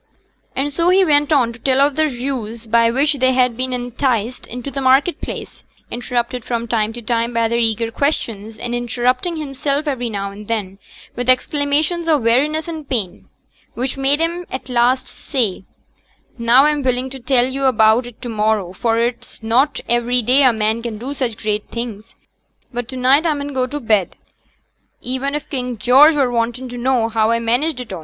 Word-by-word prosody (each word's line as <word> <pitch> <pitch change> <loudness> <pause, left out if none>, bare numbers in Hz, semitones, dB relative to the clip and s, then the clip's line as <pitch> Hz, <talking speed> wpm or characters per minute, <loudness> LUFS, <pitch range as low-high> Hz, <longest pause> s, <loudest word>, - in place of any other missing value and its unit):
And 285 +2 -1
so 340 +3 +2
he 380 +1 +5
went 295 -1 +3
on 250 -6 +3
to 230 - -14
tell 260 +2 +1
of 280 0 +3
the 315 0 +2
ruse 240 -4 -4
by 230 +1 +3
which 280 +4 +1
they 260 0 +3
had 250 -2 +2
been 255 +2 -3
enticed 245 -1 -2
into 250 +3 -6
the 275 - -3
market 270 +6 +3
place; - - -7 0.3
interrupted 240 0 -2
from 235 0 -3
time 220 -1 0
to 240 0 -9
time 230 +1 -1
by 230 0 +2
their 235 +1 0
eager 225 0 0
questions, 225 -6 -2
and 240 0 -5
interrupting 245 - -1
himself 285 0 -2
every 245 -4 -2
now 200 -2 -4
and 205 +1 -11
then 200 -4 -3 0.4
with 245 +1 -3
exclamations 295 +6 +1
of 300 -6 +2
weariness 295 +8 +2
and 315 -4 -7
pain, 205 -8 -3 0.5
which 255 +2 -2
made 275 +2 +2
him 340 +2 -2
at 260 0 -6
last 250 +1 +2
say, 220 -10 -3 0.7
'Now 240 +3 +4
a'm 300 -1 +2
willing 255 0 -1
to 270 - -8
tell 250 0 +2
yo' 270 +1 -2
a' - - +6
about 220 +1 +3
it 245 - -13
to 245 - -5
morrow, 210 -4 0
for 225 +4 0
it's 235 -1 -3
not 255 +6 +1
ivery 240 +1 +2
day 255 +5 +4
a 260 -2 +6
man 220 0 0
can 230 -2 -5
do 255 +6 -5
such 250 -6 -3
great 210 -1 -2
things; 230 -3 -7 0.6
but 245 -1 -4
to 260 - -7
neet 265 +4 +4
a 310 - +1
mun 285 0 -4
go 260 -2 -1
to 295 +3 -5
bed, 215 -7 +1 0.8
even 260 +3 -3
if 300 0 -4
King 250 -4 -4
George 270 +8 +6
were 270 -4 +1
wantin' 240 +2 -2
for - - -10
to 245 - -6
know 245 -2 +1
how 220 -1 +1
a 230 0 +2
managed 245 +6 0
it 245 - -9
a'.' 185 - -5
250 Hz, 200 wpm, -18 LUFS, 230-275 Hz, 0.8 s, a